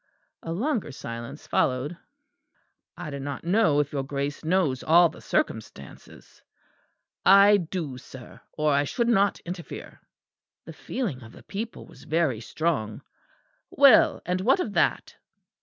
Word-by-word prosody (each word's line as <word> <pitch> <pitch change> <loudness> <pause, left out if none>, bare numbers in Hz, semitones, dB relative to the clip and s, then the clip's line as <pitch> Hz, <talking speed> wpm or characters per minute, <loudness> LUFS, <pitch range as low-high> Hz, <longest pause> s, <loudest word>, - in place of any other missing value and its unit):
A 165 - -6
longer 220 - -2
silence 115 -2 -8
followed. 130 +6 0 1.0
"I 150 - -6
do 140 - -5
not 140 0 -6
know 175 -4 +3
if 145 0 0
your 140 - -1
Grace 140 +2 -4
knows 160 -6 +1
all 170 +2 +5
the - - -14
circumstances." 70 -1 -5 0.8
"I 200 +2 +7
do, 165 -7 -5
sir, 125 -1 -13
or 150 -1 +1
I 140 +1 +3
should 235 - -1
not 200 -4 +2
interfere." 175 -1 -8 0.6
"The - - -9
feeling 195 - -4
of 115 -1 -13
the - - -15
people 220 +3 -6
was - - -16
very 155 -8 0
strong." 135 -5 -2 0.7
"Well, 275 -5 +5
and 180 +1 -1
what 260 - +3
of 220 - -3
that?" - - 0
160 Hz, 140 wpm, -26 LUFS, 140-195 Hz, 1.0 s, I